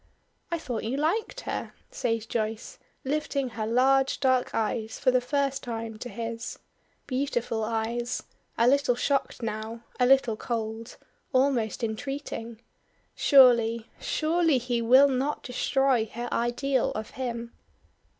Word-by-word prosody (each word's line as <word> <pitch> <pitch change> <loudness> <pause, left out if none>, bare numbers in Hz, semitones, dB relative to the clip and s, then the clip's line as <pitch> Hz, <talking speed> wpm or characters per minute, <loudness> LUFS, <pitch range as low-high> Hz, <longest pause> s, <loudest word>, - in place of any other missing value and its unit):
"I 340 - -1
thought 250 -8 -4
you 240 +5 -2
liked 435 +11 -1
her," - - -4 0.2
says 230 -2 -1
Joyce, 220 0 -3 0.3
lifting 280 -1 -1
her 220 -2 -4
large 265 +3 +3
dark 260 -2 +2
eyes 220 0 -1
for 255 - +3
the 250 0 +3
first 275 +1 0
time 225 -2 -5
to 245 - -6
his. 230 +1 -5 0.5
Beautiful 255 -4 -1
eyes! 230 +2 -2 0.3
a 235 - +4
little 275 -1 +3
shocked 275 -1 -1
now 220 +1 -4 0.2
a 250 - +4
little 260 -4 +4
cold 225 0 -4 0.4
almost 255 -4 +1
entreating. 230 -1 -4 0.5
Surely, 235 -4 +5
surely, 325 -2 +2
he 240 -1 -1
will 260 +5 +7
not 275 +2 -1
destroy 255 -2 +1
her 240 +1 -4
ideal 245 +2 +1
of 215 0 -5
him. 235 -2 -4
245 Hz, 130 wpm, -27 LUFS, 230-270 Hz, 0.5 s, will